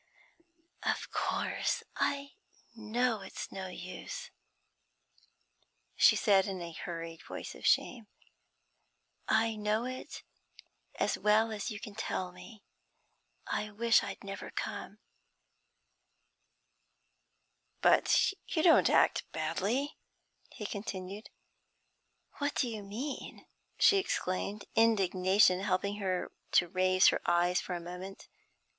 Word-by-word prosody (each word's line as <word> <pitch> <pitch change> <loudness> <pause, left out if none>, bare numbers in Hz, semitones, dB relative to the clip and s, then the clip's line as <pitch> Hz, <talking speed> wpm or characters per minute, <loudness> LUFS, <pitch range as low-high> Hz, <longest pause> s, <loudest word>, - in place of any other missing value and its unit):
'Of - - -2
course, - - -1
I 280 0 -1 0.4
know 230 +1 0
it's - - -7
no 190 -1 -5
use,' 180 0 -7 1.6
she - - +6
said 195 -3 +4
in 190 -2 -4
a 170 -1 -6
hurried 165 0 -6
voice - - -7
of - - -4
shame. 230 -5 +2 1.2
'I 220 0 +2
know 210 +2 0
it 255 0 -7 0.7
as - - 0
well 215 +2 +3
as 210 +2 -3
you 210 -3 -5
can 210 - -8
tell 190 -3 -3
me. 180 +4 -13 0.8
I 215 - -2
wish 230 +3 +3
I'd 200 -1 -6
never 195 0 -6
come.' - - -5 2.8
'But - - +4
you 315 - 0
don't 335 - +6
act - - +3
badly,' 195 - -1 0.5
he 210 - -8
continued. 200 0 -5 1.1
'What 285 0 -1
do 260 - +1
you 220 -3 -5
mean?' 230 +8 -6 0.3
she 400 - +6
exclaimed, 200 - -2
indignation 190 -3 +4
helping 200 +1 0
her 185 -3 -2 0.2
to 175 - +5
raise 185 +1 +4
her - - 0
eyes 175 +1 +3
for 180 - -4
a - - -3
moment. 180 +3 -8
200 Hz, 110 wpm, -32 LUFS, 185-225 Hz, 2.8 s, she